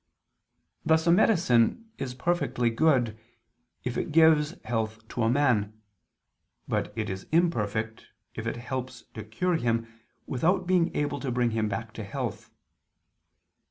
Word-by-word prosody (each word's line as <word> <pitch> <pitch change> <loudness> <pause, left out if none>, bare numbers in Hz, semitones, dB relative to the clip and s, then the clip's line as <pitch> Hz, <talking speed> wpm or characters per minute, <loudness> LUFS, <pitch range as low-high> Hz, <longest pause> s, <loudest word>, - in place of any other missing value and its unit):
Thus 160 0 +3
a 170 - +5
medicine 175 - +3
is 125 -2 -4
perfectly 130 -5 0
good, 120 -5 +2 0.6
if 125 -1 -2
it - - -3
gives 160 0 +5
health 110 -1 -3
to 120 - -3
a 115 - +3
man; 110 -6 +1 0.9
but - - -1
it 110 -2 -2
is 95 0 -6
imperfect, 110 - 0 0.3
if - - -5
it - - -2
helps 125 0 -5
to 110 - -6
cure 165 - -1
him, 115 -4 0 0.4
without 180 +8 +1
being 180 -2 +3
able 145 -1 -1
to 135 - -3
bring 120 -1 +1
him 110 -1 0
back 110 +2 -5
to 110 - -6
health. 100 - -5
125 Hz, 140 wpm, -27 LUFS, 110-160 Hz, 0.9 s, a